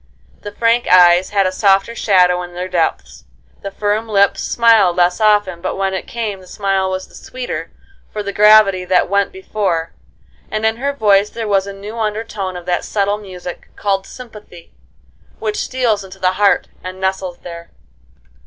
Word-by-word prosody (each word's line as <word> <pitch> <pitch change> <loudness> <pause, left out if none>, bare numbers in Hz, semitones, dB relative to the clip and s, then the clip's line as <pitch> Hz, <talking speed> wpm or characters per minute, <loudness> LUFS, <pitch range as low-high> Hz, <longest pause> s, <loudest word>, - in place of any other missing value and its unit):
The 205 - -7
frank 230 +3 +1
eyes 180 0 +6
had 200 -2 +1
a 185 - 0
softer 195 +3 +2
shadow 180 -5 +2
in 175 0 -9
their 180 +1 -4
depths, 65 - -2 0.4
the 200 - -5
firm 210 +3 -2
lips 200 -1 +2
smiled 225 -7 +3
less 180 +3 +1
often, 205 -5 +2
but 185 - -3
when 195 0 -1
it 190 - -5
came 220 -4 -4
the 185 - -16
smile 195 -1 -1
was 185 0 -4
the - - -23
sweeter 255 -1 -6 0.4
for 210 - -4
the 200 0 -5
gravity 210 -3 +5
that 180 -1 +1
went 200 0 +1
before, 195 - -3 0.6
and 215 0 -2
in 220 0 +1
her 280 +3 -1
voice 210 -6 +2
there 225 -1 -5
was 195 -1 +1
a - - -5
new 205 +4 -8
undertone 210 -4 -3
of 175 - -10
that 175 -1 -1
subtle 205 0 -1
music, 180 -3 -9
called 195 -1 -1
sympathy, 210 -8 -13 0.7
which 215 -1 -3
steals 235 -6 -1
into 190 0 -12
the 185 -1 +1
heart 200 +2 +2 0.2
and 185 0 -7
nestles 190 -1 -2
there. 170 -1 -9
195 Hz, 175 wpm, -17 LUFS, 185-215 Hz, 0.7 s, eyes